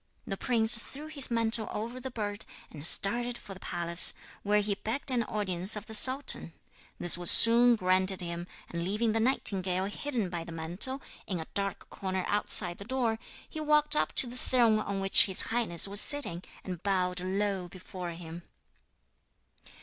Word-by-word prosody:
The 195 - -5
prince 230 +1 0
threw 280 +6 -10
his 305 -4 +3
mantle 230 -1 -1
over 235 +4 -7
the 260 +1 -8
bird, 210 -3 -6 0.3
and 145 -2 -12
started 240 +8 -2
for 195 - -12
the 190 - -15
palace, 170 -1 +3 0.3
where 210 +1 0
he 205 0 -2
begged 235 +7 -3
an 245 -2 -1
audience 190 -2 0
of 210 - -8
the 220 - -12
sultan. 255 - +5 0.5
This 175 0 +5
was 175 - +5
soon 235 +1 +7
granted 185 -1 -1
him, 170 -1 -6 0.2
and 170 0 -6
leaving 210 +5 -2
the 225 - -2
nightingale 190 -6 -1
hidden 220 -2 -5
by 170 -2 -6
the 170 - -12
mantle, 175 +12 -2 0.2
in 185 -3 -5
a 160 - -8
dark 200 -1 -5
corner 190 -1 -5
outside 190 -3 +2
the - - -9
door, 230 -1 -3 0.3
he 315 - -10
walked 300 0 +1
up - - -2
to - - 0
the 245 0 -10
throne 235 -4 0
on 200 -2 -5
which 195 0 +7
his 190 -2 +1
highness 220 -7 0
was 200 +1 +2
sitting, 265 - 0 0.2
and 180 -3 -8
bowed 185 -2 -2
low 190 0 -4
before 180 0 -10
him. 165 0 -11
205 Hz, 175 wpm, -27 LUFS, 180-235 Hz, 0.5 s, soon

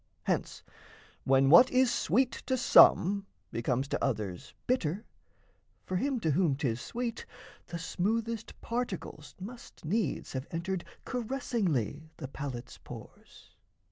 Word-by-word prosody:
Hence - - -2 0.6
when 135 +1 +4
what 210 +10 +9
is 255 -1 +3
sweet 240 - +2 0.2
to 260 - +1
some, 200 -4 +6 0.2
Becomes 125 +3 0
to - - -1
others 105 -9 -3
bitter, 210 -5 0 0.8
for 185 - -3
him 270 +4 0
to 160 - +2
whom 155 -2 +2
'Tis 130 -4 -1
sweet, 235 -1 -4 0.4
the 170 - -5
smoothest 225 +7 -2
particles 205 -10 -4
must 230 -2 -10
needs 210 +7 -1
Have 130 +1 -4
entered 175 +2 -3 0.2
caressingly 205 - -1
the 135 - -5
palate's 130 -3 -6
pores. - - -12
185 Hz, 120 wpm, -31 LUFS, 140-235 Hz, 0.8 s, what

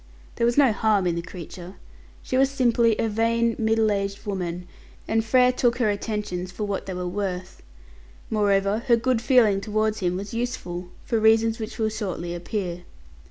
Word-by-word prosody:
There 235 - +2
was 240 - 0
no 275 -5 +6
harm 210 -3 +2
in 175 - +1
the 170 - -2
creature. 180 +1 -9 0.5
She - - -3
was 270 +1 +4
simply 240 -4 +2
a 225 - 0
vain, 230 +1 +1
middle 220 -1 +2
aged 200 +1 -3
woman, 180 -3 -4 0.4
and 225 0 +1
Frere 250 +3 +4
took 240 -1 +1
her 230 -4 +2
attentions 205 -3 -3
for 210 - -5
what 200 -2 -3
they 190 - -4
were 180 0 -3
worth. 185 -1 -4 0.7
Moreover, 200 -1 +1
her 240 - +6
good 245 0 0
feeling 225 -5 +4
towards 215 +1 0
him 180 -2 0
was 200 +3 -6
useful, 180 -7 -4 0.2
for 230 - 0
reasons 225 +1 +3
which 220 0 -6
will 220 -1 +1
shortly 185 -6 -4
appear. 175 0 -4
215 Hz, 175 wpm, -24 LUFS, 185-230 Hz, 0.7 s, no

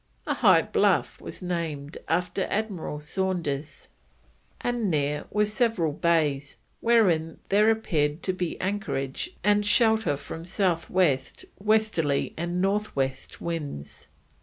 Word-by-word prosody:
A - - 0
high - - +5
bluff - - +1
was - - -7
named 160 -5 -3
after 180 +3 0
Admiral 195 -8 -2
Saunders, 155 -4 -3 0.7
and 240 -4 -1
near 150 -2 0
were 210 0 +2
several 210 -6 +1
bays, 150 -4 +1 0.2
"wherein 180 -9 +3
there 210 +2 +5
appear'd 155 -9 0
to 185 - +1
be 180 -2 -3
anchorage 160 - -2
and 210 0 +4
shelter 220 - +3
from 165 +3 -8
South 175 -1 0
West, 145 -8 +1
Westerly, 210 -9 +1
and 175 +2 -2
North 200 +3 0
West 135 -1 -3
winds." 150 - -5
175 Hz, 120 wpm, -26 LUFS, 150-205 Hz, 0.7 s, high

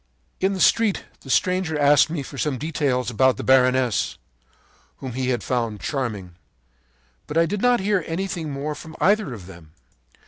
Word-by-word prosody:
“In 190 +1 +1
the 190 - -4
street 220 +1 +3
the 135 - -14
stranger 180 +1 +1
asked 145 +1 +5
me 155 -3 -3
for 135 0 -9
some 145 -4 -1
details 140 -4 -1
about 130 0 +3
the - - -5
baroness, 130 -2 +2 0.8
whom 130 -3 -7
he 130 +1 -2
had 120 -4 -1
found 115 -4 -2
charming. 105 - -4 0.9
But 150 - -3
I 165 - +5
did 200 +4 -3
not 245 -1 +4
hear 200 -2 +1
anything 170 -2 -3
more 145 +2 -3
from 160 +2 -11
either 205 -5 +2
of 105 -7 -8
them. 85 -4 -14
140 Hz, 170 wpm, -23 LUFS, 125-170 Hz, 0.9 s, asked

